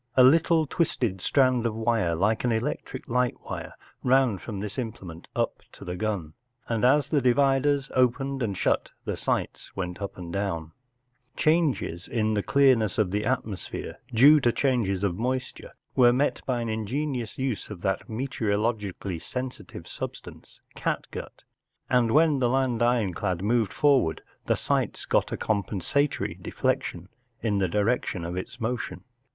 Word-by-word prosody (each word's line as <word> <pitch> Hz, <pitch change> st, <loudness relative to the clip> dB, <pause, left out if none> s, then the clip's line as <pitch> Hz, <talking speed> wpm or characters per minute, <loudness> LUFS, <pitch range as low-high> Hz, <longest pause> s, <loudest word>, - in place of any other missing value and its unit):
A 130 Hz, -, +8 dB
little 160 Hz, +4 st, +5 dB
twisted 125 Hz, -, -1 dB
strand 130 Hz, -1 st, +3 dB
of 110 Hz, -, -3 dB
wire 110 Hz, -7 st, +1 dB
like 105 Hz, +9 st, +1 dB
an 125 Hz, -, +2 dB
electric 125 Hz, +3 st, -3 dB
light 125 Hz, 0 st, +1 dB
wire -, -, -6 dB, 0.3 s
ran 130 Hz, -5 st, +3 dB
from 105 Hz, -1 st, -6 dB
this 105 Hz, 0 st, -5 dB
imple¬ 115 Hz, -6 st, -4 dB
ment 85 Hz, -2 st, -10 dB
up -, -, -1 dB
to -, -, -11 dB
the 90 Hz, -, -4 dB
gun, 95 Hz, -6 st, -2 dB, 0.3 s
and 115 Hz, -1 st, -1 dB
as 135 Hz, +2 st, +4 dB
the 145 Hz, -3 st, +2 dB
dividers 135 Hz, +2 st, +2 dB
opened 135 Hz, +2 st, +1 dB
and 100 Hz, -5 st, -1 dB
shut -, -, +1 dB, 0.2 s
the -, -, -2 dB
sights -, -, -2 dB
went 90 Hz, +1 st, -4 dB
up 100 Hz, 0 st, -5 dB
or 85 Hz, -2 st, -7 dB
down* 85 Hz, -5 st, -2 dB, 0.7 s
Changes 155 Hz, -, +1 dB
in 110 Hz, -2 st, 0 dB
the 105 Hz, -, +1 dB
clearness 130 Hz, -4 st, +3 dB
of 105 Hz, -5 st, +2 dB
the 105 Hz, +2 st, -1 dB
atmosphere, 115 Hz, -6 st, -3 dB
due 140 Hz, +7 st, +7 dB
to 120 Hz, -4 st, +3 dB
changes 115 Hz, -8 st, 0 dB
of 95 Hz, -1 st, 0 dB
moisture, 125 Hz, +1 st, -3 dB, 0.2 s
were 120 Hz, -2 st, +6 dB
met 135 Hz, +4 st, +1 dB
by 125 Hz, -2 st, 0 dB
an 115 Hz, -, -3 dB
ingenious 120 Hz, +3 st, -2 dB
use 130 Hz, -5 st, -2 dB
of 100 Hz, -5 st, -8 dB
that 95 Hz, 0 st, -1 dB
meteorologically 105 Hz, -5 st, -2 dB
sen¬ 125 Hz, +7 st, -4 dB
sitive -, -, -11 dB
substance, -, -, -8 dB
catgut, -, -, -4 dB, 0.5 s
and 125 Hz, -2 st, +4 dB
when 155 Hz, -1 st, +4 dB
the 125 Hz, -2 st, +2 dB
land 130 Hz, -2 st, +1 dB
ironclad 100 Hz, -6 st, +1 dB
moved 110 Hz, -1 st, +2 dB
forward 135 Hz, -, +2 dB, 0.2 s
the -, -, +3 dB
sights -, -, -1 dB
got -, -, +1 dB
a -, -, -2 dB
com¬ 105 Hz, -2 st, 0 dB
pensatory 135 Hz, -, -1 dB
deflection 85 Hz, +1 st, -2 dB, 0.4 s
in 105 Hz, -3 st, +1 dB
the 95 Hz, -, +2 dB
direction 105 Hz, -2 st, 0 dB
of 85 Hz, +1 st, -4 dB
its 95 Hz, +7 st, -6 dB
motion. 120 Hz, +1 st, -3 dB
115 Hz, 160 wpm, -26 LUFS, 100-130 Hz, 0.7 s, A